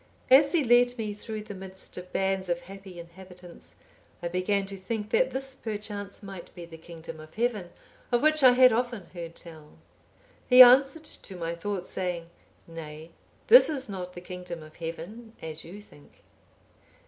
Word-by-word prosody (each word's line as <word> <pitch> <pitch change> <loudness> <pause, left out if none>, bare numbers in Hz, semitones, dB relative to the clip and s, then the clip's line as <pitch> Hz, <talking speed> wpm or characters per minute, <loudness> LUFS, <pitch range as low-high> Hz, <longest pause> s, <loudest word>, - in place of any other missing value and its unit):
As 280 +2 +7
he 330 -4 +3
led 245 0 +4
me 215 -2 -3
through 215 +1 -7
the 210 -1 -8
midst 190 0 -7
of 180 0 -9
bands 190 -1 -1
of 175 0 -1
happy 195 -1 -11
inhabitants, 180 +1 -13 0.5
I 170 - -2
began 195 +3 0
to 195 0 -7
think 210 +2 -5
that - - +3
this 270 0 -4
perchance 205 -3 -6
might 195 -3 -9
be 175 - -8
the 165 -1 -12
kingdom 165 -1 -10
of 155 0 -13
Heaven, 220 -6 -1 0.4
of 240 +1 +2
which 310 0 +4
I 255 -2 +8
had 255 -1 +6
often 240 -4 -2
heard 170 -2 -8
tell. 155 -3 -13 0.7
He 255 0 +11
answered 270 +5 +5
to 195 - -9
my 170 -1 -4
thought, 185 +2 -4
saying, 175 -3 -4 0.4
'Nay, 160 -1 -9 0.3
this - - +8
is 270 -4 -3
not 180 -3 -6
the 175 - -9
kingdom 180 -2 -8
of 155 0 -15
Heaven, 175 +8 -7
as 160 -1 -7
you 190 +5 -10
think. 145 -8 -19
190 Hz, 170 wpm, -27 LUFS, 170-235 Hz, 0.7 s, He